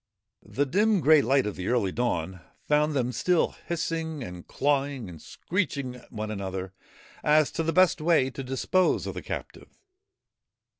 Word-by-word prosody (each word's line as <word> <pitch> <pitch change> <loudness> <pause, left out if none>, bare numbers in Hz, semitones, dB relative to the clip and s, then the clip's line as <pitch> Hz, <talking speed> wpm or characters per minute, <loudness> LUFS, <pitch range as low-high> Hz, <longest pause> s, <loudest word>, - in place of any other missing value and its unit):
The 145 - -1
dim 205 +8 +2
grey 155 -1 +6
light 135 +1 +2
of 105 - -3
the 90 - -5
early 115 -6 +1
dawn 95 -7 -2 0.3
found 150 +1 +2
them 125 -3 0
still 165 +9 +1 0.2
hissing 160 -3 -3
and 90 -5 -9
clawing 140 -4 0
and 85 -3 -10
screeching 140 -9 -3
at 125 - -16
one 110 -2 -4
another 95 -2 -5 0.5
as 150 0 +4
to 165 - -2
the 165 0 0
best 185 -1 +4
way 155 -5 +3
to 135 - -6
dispose 135 +8 +1
of - - -4
the - - -6
captive. - - -8
135 Hz, 160 wpm, -27 LUFS, 110-160 Hz, 0.5 s, grey